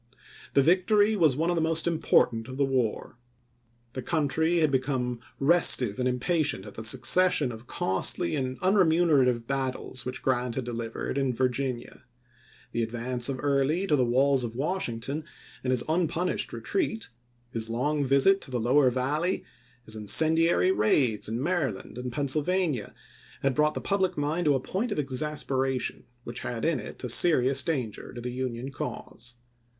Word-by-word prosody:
The 140 - +5
victory 205 +6 +3
was 160 -9 +3
one 165 +4 0
of - - 0
the 165 - 0
most 160 0 +1
important 125 -8 +1
of 130 0 -8
the 140 - +2
war. 125 -3 -2 0.7
The 130 - -4
country 160 +4 0
had 155 -3 +2
become 130 -2 -1 0.2
restive 135 -8 +3
and 125 - +1
impatient 140 - 0
at - - -10
the 110 - -8
succession 150 +4 +4
of 115 +2 -11
costly 95 -2 0
and 130 -2 -3
unremunerative 160 - +3
battles 130 -1 -3
which 125 0 -6
Grant 125 -2 0
had 130 - -2
delivered 115 +2 -4
in 130 -3 -1
Virginia. 130 0 -2 0.7
The 120 - -2
ad 115 - -2
vance 120 +2 -2
of 130 -1 -3
Early 145 +6 +1
to 155 - +2
the 130 - +2
walls 130 +2 +2
of 115 -1 -5
Washington 140 -2 -3 0.4
and 130 - -2
his 125 -2 +1
unpunished 170 +2 -1
retreat, 290 - -2 0.4
his 115 -1 -3
long 145 +6 0
visit 140 +9 +3
to - - -5
the 125 -2 -2
lower 130 +4 +3
Val 130 +5 -1
ley, 180 +2 -1 0.4
his 110 - -5
incendiary 160 - +4
raids 110 - +1
in 115 +4 -3
Maryland 145 - -2
and 125 0 -5
Penn 140 +3 -2
sylvania, 150 - -1 0.5
had 135 -1 +2
brought 150 +2 +1
the - - -3
public 190 -2 0
mind 155 +4 -1
to 145 -2 +4
a - - +1
point 205 - -3
of - - -2
exasperation 135 -2 -2 0.2
which 120 +1 -7
had 115 -2 -4
in 165 -1 +1
it - - -9
a - - -2
serious 135 0 +4
danger 130 - -3
to 120 - -7
the 125 +1 -4
Union 125 +1 -4
cause. 120 -2 -7
135 Hz, 165 wpm, -27 LUFS, 125-160 Hz, 0.7 s, The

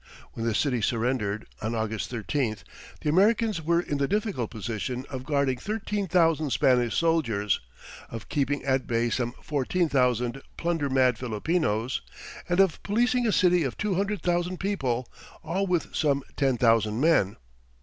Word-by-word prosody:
When 115 0 -3
the 115 - 0
city 125 -3 +1
surrendered, 115 -2 -1 0.2
on 110 +2 -2
August 110 0 -2
13th, 115 -3 -2 0.4
the - - -1
Americans 210 +1 +3
were 170 +2 +2
in 145 -5 -2
the 140 - +1
difficult 200 - -1
position 120 +3 -4
of 130 -1 -5
guarding 140 -3 +1
thirteen 205 - -3
thousand 165 -3 +3
Spanish 125 -2 +2
soldiers, 120 - +1 0.5
of 115 -1 -7
keeping 145 0 -1
at 130 -1 0
bay 120 0 +1
some 120 0 -1
fourteen 155 +4 0
thousand 125 -1 +1 0.2
plunder 165 -4 -1
mad 130 -3 +3
Filipinos, 125 0 -1 0.5
and 175 +1 +1
of 190 -4 +3
policing 245 +3 +1
a - - +3
city 180 -3 +4
of 130 -4 -3
two 210 -2 -1
hundred 200 +2 -1
thousand 175 +1 0
people 130 - -1 0.4
all 185 +5 -1
with 175 -3 -1
some 140 -3 +1
ten 135 -3 +1
thousand 115 -2 +3
men! 140 - +3
140 Hz, 155 wpm, -27 LUFS, 120-175 Hz, 0.5 s, city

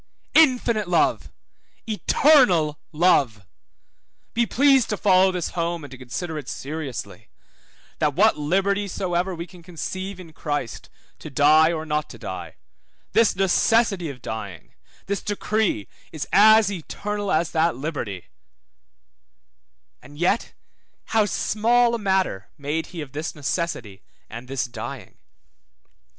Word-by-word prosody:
Infinite 245 - +4
love, 175 -1 +1 0.6
eternal 210 - +3
love; 140 - +2 0.9
be 235 0 +1
pleased 270 0 +4
to 210 - -1
follow 190 -1 +4
this 180 -2 -3
home, 170 -1 -3
and 145 - -10
to 130 - -9
consider 155 +6 -5
it 135 - -9
seriously, 145 -3 -6 0.7
that - - +1
what - - +4
liberty 195 +7 0
soever 180 0 -2
we 170 0 -6
can 175 0 -16
conceive 185 +3 -6
in 165 -3 -12
Christ 145 -7 -4 0.3
to - - -8
die 155 +3 +5
or 160 -2 -3
not 150 -1 -2
to - - -10
die; - - -7 0.6
this 230 -2 +3
necessity 195 -1 +2
of 130 -3 -10
dying, 100 -6 -7 0.3
this 200 0 -2
decree 210 - -1 0.2
is 155 -3 -5
as 215 0 +6
eternal 205 +3 -4
as 160 +1 +1
that 165 +1 +1
liberty; 130 - -5 1.8
and 140 +3 -14
yet 175 +7 0 0.6
how 220 -2 +4
small 235 +4 +2
a 235 - -1
matter 190 - 0
made 150 +3 -3
he 170 -3 -7
of 140 -3 -8
this 155 +4 -5
necessity 140 - -3 0.3
and 120 +3 -8
this 135 0 -2
dying? 120 -2 -8
170 Hz, 130 wpm, -23 LUFS, 145-200 Hz, 1.8 s, as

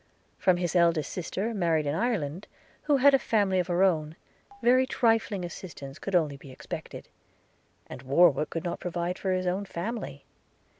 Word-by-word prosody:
From 185 -2 +3
his 175 0 -2
eldest 170 -4 +2
sister 195 +5 -3
married 165 -6 +1
in 145 - -1
Ireland, 185 -4 -2 0.4
who 290 -2 +3
had 280 +2 +6
a 270 - +5
family 200 -6 +1
of 180 - -1
her 180 +1 +2
own, 160 -4 +1 0.5
very 255 +2 +4
trifling 225 -7 +1
assistance 160 -6 -9
only 155 -6 +1
could - - -27
be 135 - -11
expected; - - -8 0.8
and - - -9
Warwick 150 +3 +3
could 165 - -4
not 175 - -3
provide 175 +1 -3
for 190 - -1
his 185 0 0
own 185 +3 -1
family. 190 - -5
180 Hz, 165 wpm, -28 LUFS, 160-200 Hz, 0.8 s, had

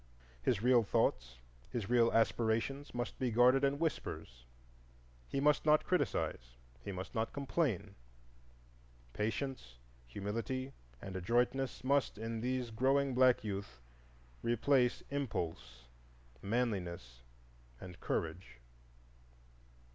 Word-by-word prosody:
His 95 - +1
real 125 -1 +6
thoughts, 65 - 0 0.3
his 115 -5 -3
real 120 -1 +4
aspirations, 115 +5 +1
must 120 0 -4
be 130 - +1
guarded 125 +4 +5
in 140 0 +2
whispers; - - -4 0.8
he 140 - -2
must 145 +1 +3
not 150 0 +4
criticise, 60 - -1 0.3
he - - -5
must 95 -1 -6
not 110 0 -1
complain. 135 - -1 1.2
Patience, 110 - -3 0.3
humility, 115 - -4 0.3
and 95 -1 -6
adroitness 120 +8 0
must, 140 -2 +1
in 115 +1 -4
these 125 -1 -2
growing 135 +4 +2
black 125 -2 +4
youth, 100 -11 -5 0.6
replace 125 +2 +2
impulse, 85 - -4 0.6
manliness, 90 - -2 0.6
and 90 -1 -10
courage. 80 -6 -3
115 Hz, 100 wpm, -35 LUFS, 95-130 Hz, 1.2 s, real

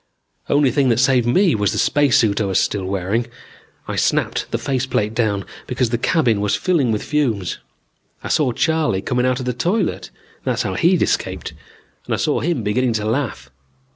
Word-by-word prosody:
Only 145 -2 +3
thing 135 +1 +2
that 115 - +2
saved 130 -2 +3
me 180 +8 +3
was 105 -2 0
the - - -3
spacesuit 120 -8 +2
I - - +1
was 95 -1 +1
still 100 -2 -1
wearing. 100 +5 -1 0.6
I - - -4
snapped - - 0
the - - -1
face 130 -1 -2
plate 105 -4 -1
down 105 -4 0 0.2
because 125 -2 -1
the 120 - 0
cabin 120 -7 +2
was 105 -1 +1
filling 160 -10 +1
with 105 - -1
fumes. 120 - -1 0.6
I - - -5
saw 145 -5 +2
Charley 155 - 0
coming 125 0 0
out 130 0 0
of 130 - -5
the 125 - -1
toilet 180 - -1 0.3
that's - - -1
how 95 - -2
he'd 175 - +3
escaped - - -2 0.5
and - - -1
I - - -4
saw - - 0
him 160 -7 -1
beginning 120 +4 +1
to 105 -1 -2
laugh. 110 - -2
120 Hz, 190 wpm, -20 LUFS, 105-140 Hz, 0.6 s, Only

